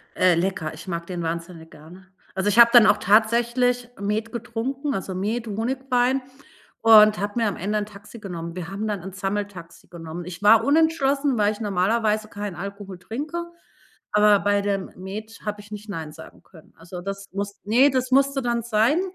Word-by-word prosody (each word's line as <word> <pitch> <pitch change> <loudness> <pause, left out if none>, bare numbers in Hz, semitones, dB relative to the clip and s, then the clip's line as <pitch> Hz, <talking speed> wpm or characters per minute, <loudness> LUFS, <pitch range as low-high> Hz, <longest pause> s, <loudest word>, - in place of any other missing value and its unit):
Äh, 180 -2 +4
lecker, 170 -3 -2
ich 165 +4 -11
mag 170 -1 -4
den 175 -2 -5
wahnsinnig 165 0 -5
gerne. 175 +5 -15 0.3
Also, 190 +2 0
ich 205 +3 +2
habe 235 - +9
dann 240 -3 +9
auch 210 - +5
tatsächlich 235 +4 +2
Met 210 +3 -2
getrunken, 245 +5 -3
also 190 0 -4
Met, 225 +5 -2
Honigwein, 250 +4 0 0.6
und 215 -2 +7
habe 205 +1 -3
mir 225 - +2
am 200 - -3
Ende 205 +4 -2
'n 205 - -3
Taxi 210 +2 -13
genommen. 170 -4 -7
Wir 180 -1 -6
haben 205 +3 -4
dann 205 -4 -3
'n 190 - -8
Sammeltaxi 195 -2 -5
genommen. 165 0 -8
Ich 180 +1 -8
war 220 +2 +6
unentschlossen, 285 -2 +2
weil 205 0 +3
ich 210 - -8
normalerweise 215 +2 0
keinen 205 -2 -6
Alkohol 195 +1 -7
trinke, 295 - -5 0.7
aber 210 -1 +5
bei 205 0 +2
dem 200 -1 -2
Met 215 +4 -8
hab 210 -1 -3
ich 205 +1 -15
nicht 210 +1 -9
„nein“ 160 -6 -6
sagen 160 +1 -14
können. 160 -4 -19
Also, 175 +2 -9
das 195 +2 -6
muss 200 +1 -5
ne, 245 +8 +4
das 255 0 -1
musste 275 +1 +3
dann 235 -1 -1
sein. 235 +8 +2
205 Hz, 185 wpm, -23 LUFS, 190-235 Hz, 0.7 s, habe